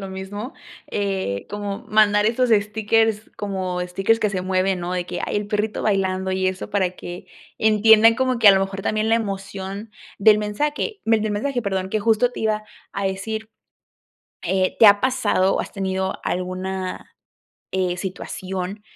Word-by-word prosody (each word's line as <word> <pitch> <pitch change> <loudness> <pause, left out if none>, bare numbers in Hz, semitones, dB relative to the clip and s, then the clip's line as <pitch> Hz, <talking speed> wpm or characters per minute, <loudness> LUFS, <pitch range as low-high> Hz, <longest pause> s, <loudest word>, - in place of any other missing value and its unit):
lo 195 - -6
mismo, 205 +6 -6 0.4
eh, 190 - -2
como 205 -1 -5
mandar 210 -1 +4
esos 240 +2 +1
stickers 220 +1 +1
como 185 -3 -3
stickers 195 +5 +1
que 210 -2 +1
se 185 -2 -2
mueven, 185 0 +1
¿no?, 175 +1 -3
de 180 -1 -1
que, - - -5
ay, - - -2
el 205 - -2
perrito 210 0 -1
bailando 190 -2 0
y 185 0 0
eso 185 0 -3
para 190 -3 +1
que 175 -1 -9 0.3
entiendan 220 +1 +6
como 255 0 0
que, 225 - +3
a - - +10
lo 195 - +3
mejor, 195 0 -3
también 215 +1 0
la 225 - +4
emoción 195 0 -5 0.3
del 210 +1 +6
mensaje, 295 - -2
del 220 -1 +2
mensaje, 245 +3 -1
perdón, 190 -2 -2
que 215 - 0
justo 225 +3 +2
te - - -8
iba 215 -1 0 0.3
a 200 -1 -2
decir, 220 +3 -4 0.9
eh, 185 +1 0
¿te 220 - +8
ha 205 0 +7
pasado, 255 -7 +2
o - - 0
has - - -7
tenido 190 -1 -2
alguna, 185 +1 -4 0.6
eh, 185 -1 0
situación 190 +1 -5
200 Hz, 170 wpm, -22 LUFS, 190-220 Hz, 0.9 s, a